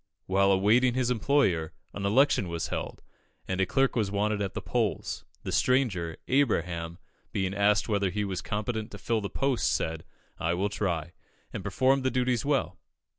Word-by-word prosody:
While 100 +1 +3
awaiting 115 +6 +4
his 125 -1 +1
employer, 105 - +1 0.2
an 100 0 -2
election 115 -3 +3
was 85 -1 -3
held, - - -5 0.4
and 95 0 -1
a 95 - +2
clerk 135 +5 +2
was 110 -5 +1
wanted 105 +1 0
at 100 -2 -3
the - - -1
polls. - - -2 0.2
The - - -4
stranger, 100 -11 +1
Abraham, 85 - 0 0.3
being 95 -1 -1
asked 100 +1 +2
whether 100 -3 +1
he 105 +3 -2
was 95 -2 -3
competent 110 0 -3
to 105 - -9
fill 115 +1 -1
the 100 - -4
post, 135 -3 0
said, 80 0 -2 0.4
"I 85 +1 0
will 100 +3 0
try," 85 -5 -2 0.4
and - - -5
performed 135 +1 +2
the 130 - +2
duties 125 -2 0
well. 140 -2 0
105 Hz, 175 wpm, -28 LUFS, 95-125 Hz, 0.4 s, awaiting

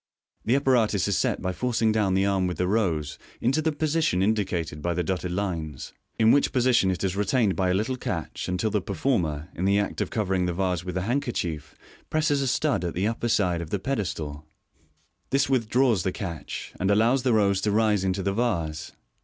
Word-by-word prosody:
The 120 - +3
apparatus 120 -8 +2
is 100 - +1
set - - 0
by 95 0 -1
forcing 115 +1 +1
down 105 -3 +1
the 95 +1 +2
arm 95 -2 +1
with 90 - -3
the 90 - +1
rose 85 -8 0 0.2
into 135 +6 +1
the 160 0 +1
position 150 - +1
indicated 95 -7 -1
by 85 +2 -1
the 90 - 0
dotted 90 +1 -2
lines, 85 -7 -4 0.2
in 110 0 +5
which 145 - +3
position 125 -6 +3
it 95 0 -2
is 95 -1 0
retained 105 0 +1
by 95 -1 +1
a 90 - +2
little 115 +6 -1
catch, - - -4
until 90 +4 0
the 105 - +1
per 100 - -5
former, 85 - 0
in 90 - -4
the 100 +1 +3
act 100 - -1
of - - -1
covering 95 -4 0
the 90 - -1
vase 90 -2 -1
with 90 0 -5
the 90 - -1
handkerchief, 95 - -2 0.3
presses 150 -2 +1
a 135 - 0
stud 130 -1 +1
at 85 - -3
the 95 +3 0
upper 115 +1 -2
side 90 -6 +1
of 80 - -7
the 100 - 0
pedestal. 85 - -3 0.9
This 135 +1 +2
withdraws 120 -3 +2
the 95 - -1
catch, 85 -4 -6
and 95 - +1
allows 115 +6 +3
the 125 -1 +2
rose 100 -3 +3
to 105 - 0
rise 105 -2 +2
into 95 0 -1
the 100 - 0
vase. 85 -9 -2
100 Hz, 210 wpm, -26 LUFS, 90-120 Hz, 0.9 s, in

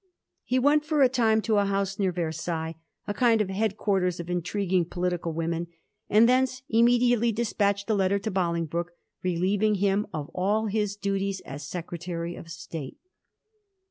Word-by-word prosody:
He 255 - 0
went 290 +3 +4
for 300 -2 +2
a 260 - +6
time 225 -3 +2
to 215 -3 +2
a - - +3
liouse 195 0 -1
near 190 -2 +2
Versailles, 165 -1 -3 0.3
a 205 - -2
kind 230 -1 +3
of 200 -3 0
head 210 +1 -1
quarters 185 -4 0
of 170 +1 -5
intriguing 180 +1 0
political 175 -1 -2
women, 165 +1 -2 0.4
and 220 +3 +6
thence 255 0 +2
immediately 235 0 +4
despatched 205 -3 0
a 220 - +2
letter 195 -1 +2
to 200 +2 -3
Bolingbroke, 170 -2 -1 0.3
relieving 190 +4 +1
him 200 +1 +1
of 150 -1 -5
all 205 +4 +1
his 210 -1 -1
duties 195 -1 -2
as 140 +2 -8
Secretary 175 0 -5
of 165 - -11
State. 160 -4 -7
195 Hz, 160 wpm, -27 LUFS, 175-220 Hz, 0.4 s, a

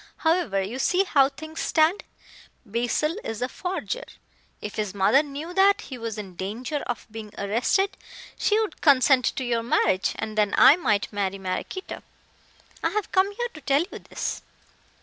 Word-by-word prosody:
However, 320 - +1
you 230 +7 -5
see 365 +7 +3
how 275 -8 +4
things 315 +3 -9
stand. 320 +5 +2 0.6
Basil 245 - -1
is 225 +2 -4
a - - 0
forger. 375 - -4 0.6
If 210 - -6
his 210 -2 -2
mother 200 +8 +4
knew 300 +4 -7
that 390 +2 +4
he 260 - -8
was 230 -1 -4
in 195 -4 -7
danger 220 - -4
of 240 -3 -4
being 220 -1 -8
arrested 245 - +1 0.4
she 425 +1 +2
would 430 -7 -3
consent 265 -3 +5
to 265 - -1
your 235 -2 0
marriage, 190 -4 +1
and 220 -1 -5
then 210 -1 +2
I 290 - +9
might 210 - 0
marry 195 -1 -1
Maraquito. 195 - -5 0.8
I - - +2
have 425 0 -3
come 380 +2 +3
here 480 +2 -2
to 310 - -11
tell 280 +3 +2
you - - -7
this." - - -4
260 Hz, 170 wpm, -25 LUFS, 215-340 Hz, 0.8 s, I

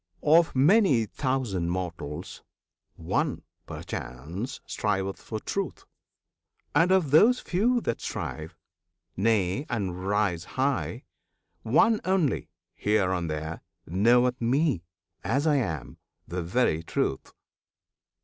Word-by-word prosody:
Of 160 +1 +4
many 145 - +4
thousand 115 - -1
mortals, 85 -3 -5 0.5
one, - - -1 0.2
perchance, 85 - -6
Striveth 95 -2 -2
for 110 - -5
Truth; 195 - -4 0.9
and 165 +5 +4
of 185 -7 +3
those 225 - +6
few 235 +7 +1
that 115 - -2
strive 80 0 -5 0.6
Nay, 105 +5 +1
and 95 -4 -3
rise 100 -4 +1
high 135 0 0 0.6
one 215 - +3
only 185 -7 +1 0.2
here 105 -3 +1
and 85 -3 -2
there 80 +1 -4 0.2
Knoweth 120 +7 +3
Me, 130 - +2 0.4
as 140 +3 0
I 150 -2 +4
am, 80 - -3 0.3
the 90 +1 -3
very 85 -2 +1
Truth. 70 -4 -2
115 Hz, 105 wpm, -27 LUFS, 90-145 Hz, 0.9 s, those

